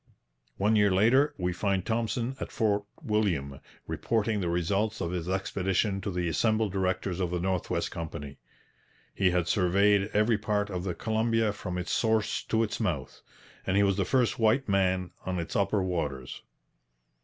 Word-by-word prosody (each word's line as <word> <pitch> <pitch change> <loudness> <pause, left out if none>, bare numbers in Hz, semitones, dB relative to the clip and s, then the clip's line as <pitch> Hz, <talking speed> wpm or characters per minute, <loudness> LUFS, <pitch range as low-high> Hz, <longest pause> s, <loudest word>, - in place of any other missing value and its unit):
One 105 +3 +2
year 105 -1 +5
later 125 +10 +4
we 90 -1 -1
find 95 0 0
Thompson 115 +2 -1
at - - -5
Fort 105 -2 +1 0.2
William 90 - 0 0.3
reporting 110 -2 0
the 85 - -1
results 100 +6 0
of 85 -2 -2
his 90 -1 -3
expedition 95 +1 0
to 100 - -3
the 90 -2 -1
assembled 110 +5 +1
directors 95 -1 -1
of 90 -2 0
the 90 0 -2
North 90 0 -1
West - - -1
Company. 80 -4 -6 0.7
He 95 -2 +2
had 90 -1 0
surveyed 100 +1 +3
every 105 +1 +2
part 105 -1 -1
of 90 -1 -3
the 90 - -2
Columbia 110 -1 +1
from 90 -3 -5
its 90 - -3
source 110 -2 +1
to 115 0 +1
its 110 - -3
mouth. 85 - -3 0.5
And 95 - +2
he 100 - +5
was 100 -1 +2
the 100 - +2
first 125 +4 +1
white 115 +5 +3
man 95 -2 +1
on 95 -1 -2
its 85 -1 -4
upper 100 0 +2
waters. 75 -8 -3
100 Hz, 170 wpm, -28 LUFS, 90-110 Hz, 0.7 s, year